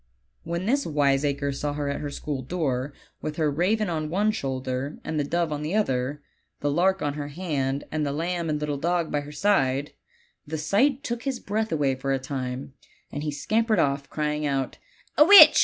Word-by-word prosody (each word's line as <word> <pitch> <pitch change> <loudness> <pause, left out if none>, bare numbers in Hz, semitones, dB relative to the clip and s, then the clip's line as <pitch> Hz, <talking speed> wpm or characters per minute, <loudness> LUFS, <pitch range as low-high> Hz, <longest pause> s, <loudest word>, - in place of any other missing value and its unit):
"When 170 +2 -3
this 275 +6 +2
wiseacre 140 -1 +1
saw 145 +1 -2
her 145 -1 -2
at 140 - -2
her 145 - -3
school 140 -1 -4
door, 135 -2 -2 0.3
with 155 - -4
her 155 -2 +1
raven 200 +8 +1
on 155 -3 -2
one 205 +6 +2
shoulder 130 -2 -3
and 155 - -2
the - - +2
dove 170 +2 0
on 150 0 -2
the 155 +6 -2
other, 140 -7 0 0.4
the 145 - 0
lark 190 +5 +2
on 145 -1 0
her 145 -1 -4
hand, 145 -4 -2
and 155 0 -1
the 140 - 0
lamb 170 +2 -2
and 150 -1 0
little 150 -1 -2
dog 170 +1 0
by 145 - 0
her 145 +1 -9
side, 145 -6 +1 0.5
the 160 +2 -3
sight 245 - +2
took 235 -4 -3
his 265 -2 -2
breath 220 +2 -2
away 145 -4 +2
for 135 +1 -2
a - - +2
time, 130 0 -5 0.4
and 145 - -4
he 150 - -2
scampered 215 +10 +1
off 140 -3 +1
crying 150 0 -1
out> 135 -3 -1 0.4
"A - - +11
witch! 400 +5 +10
150 Hz, 200 wpm, -26 LUFS, 140-175 Hz, 0.5 s, A